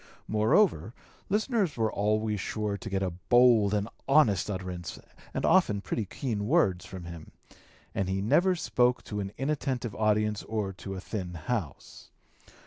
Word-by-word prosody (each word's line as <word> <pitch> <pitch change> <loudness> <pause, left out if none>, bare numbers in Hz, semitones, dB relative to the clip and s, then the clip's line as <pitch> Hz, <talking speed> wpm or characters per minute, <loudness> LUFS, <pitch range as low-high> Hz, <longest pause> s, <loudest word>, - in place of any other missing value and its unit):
Moreover, 110 - +2 0.3
listeners 210 - 0
were 110 -1 0
always 105 0 0
sure 105 +1 -2
to 100 - -7
get 95 0 -1
a 95 - -1
bold 115 +3 +4
and 100 -1 0
an 115 - -13
honest 110 -10 +4
utterance 90 -3 -5 0.3
and - - -2
often 105 -1 +4
pretty 105 +2 -3
keen 105 0 -3
words 95 - +2
from 95 -1 -8
him, 85 -2 -10 0.6
and 95 -1 -1
he 95 0 0
never 160 - +3
spoke 125 -6 +1
to 105 - -5
an 100 -1 -3
inattentive 135 -5 -2
audience 105 0 +1
or 105 -3 -3
to 95 +1 -7
a - - -5
thin 90 -4 -5
house. 80 - -5
105 Hz, 155 wpm, -29 LUFS, 95-125 Hz, 0.6 s, bold